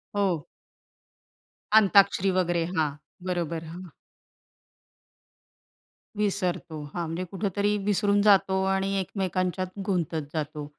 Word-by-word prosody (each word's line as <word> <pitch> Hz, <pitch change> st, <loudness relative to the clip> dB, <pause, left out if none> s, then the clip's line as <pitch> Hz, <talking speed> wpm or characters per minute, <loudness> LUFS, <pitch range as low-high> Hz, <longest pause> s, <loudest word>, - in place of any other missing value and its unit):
हो. 185 Hz, -6 st, 0 dB, 1.3 s
अंताक्षरी 195 Hz, -2 st, +5 dB
वगैरे. 175 Hz, -2 st, +1 dB
हां. 155 Hz, -2 st, +2 dB, 0.4 s
बरोबर. 170 Hz, -2 st, -2 dB
हां. 180 Hz, 0 st, -9 dB, 2.3 s
विसरतो, 185 Hz, -6 st, -1 dB
हां. 175 Hz, -1 st, -2 dB
म्हणजे 165 Hz, +3 st, -3 dB
कुठेतरी 200 Hz, +1 st, 0 dB
विसरून 205 Hz, 0 st, +2 dB
जातो 190 Hz, -2 st, +4 dB
आणि 195 Hz, 0 st, 0 dB
एकमेकांच्यात 185 Hz, -1 st, -2 dB, 0.2 s
गुंतत 170 Hz, -5 st, -1 dB
जातो. 150 Hz, -1 st, -4 dB
185 Hz, 90 wpm, -26 LUFS, 170-200 Hz, 2.3 s, अंताक्षरी